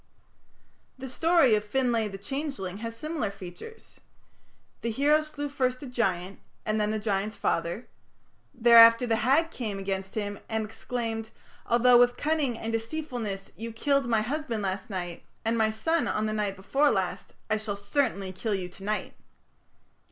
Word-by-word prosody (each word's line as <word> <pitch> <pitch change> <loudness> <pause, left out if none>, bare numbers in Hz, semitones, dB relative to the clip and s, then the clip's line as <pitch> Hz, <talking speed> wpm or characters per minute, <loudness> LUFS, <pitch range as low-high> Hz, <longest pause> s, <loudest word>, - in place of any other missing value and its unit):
The 265 0 -7
story 325 -1 +4
of 210 -1 +2
"Finlay 230 0 +1
the 195 -1 -7
Changeling" 230 - -4
has 230 0 -5
similar 305 -3 -2
features. 195 - -11 0.8
The 230 - -1
hero 290 +6 +3
slew 305 -1 -5
first 255 -2 -1
a - - -5
giant 195 -7 -1 0.3
and 215 0 +1
then 210 - +1
the 215 - 0
giant's 210 0 -1
father. 170 +8 -1 0.6
Thereafter 230 -1 +8
the 225 -2 +1
Hag 280 +8 +3
came 215 -9 -4
against 195 0 -4
him 205 -2 -3
and 220 -1 -1
exclaimed, 225 0 -4 0.4
"Although 240 +1 +6
with 245 0 +4
cunning 295 -6 0
and 225 0 -4
deceitfulness 225 -5 -4
you 230 +1 -6
killed 275 +3 +1
my 225 -2 +3
husband 240 -3 -2
last 190 +2 -3
night 175 -4 -4 0.2
and 225 +1 +2
my 220 -1 +3
son 310 +10 0
on 215 - 0
the 215 - -1
night 205 -2 -1
before 270 +10 +2
last, 185 -3 -2
I 215 - +1
shall 215 -1 -3
certainly 200 -2 -1
kill 205 +3 -2
you 180 -2 -4
to 185 +2 -12
night." 210 +1 -2
225 Hz, 160 wpm, -28 LUFS, 205-255 Hz, 0.8 s, Thereafter